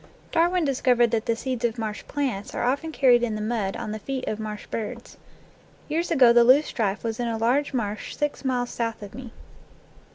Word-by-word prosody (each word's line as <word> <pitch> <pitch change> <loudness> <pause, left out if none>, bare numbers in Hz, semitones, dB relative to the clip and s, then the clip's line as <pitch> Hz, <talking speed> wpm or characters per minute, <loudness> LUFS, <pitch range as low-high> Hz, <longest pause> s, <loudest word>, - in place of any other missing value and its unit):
Darwin 345 +1 +2
discovered 250 -4 +3
that 225 -1 -1
the 230 - +2
seeds 250 0 -4
of 235 0 0
marsh 215 -2 -4
plants 255 -9 -3
are - - -1
often 280 +6 0
carried 250 -5 +4
in 230 -3 -1
the - - -4
mud 210 -3 -2
on 215 - -5
the 215 - -4
feet 260 +4 -4
of 215 - -2
marsh 215 -1 -6
birds. 230 +2 -6 0.7
Years 330 +3 -1
ago 255 -7 +6
the 240 0 +7
loosestrife 235 -6 +3
was 225 0 -3
in 240 - -1
a 230 -1 -1
large 250 +6 +1
marsh 215 -5 -3
six 295 -1 -2
miles 250 -2 -1
south 230 -2 -3
of 200 - -9
me. 250 0 -9
240 Hz, 200 wpm, -25 LUFS, 220-265 Hz, 0.7 s, the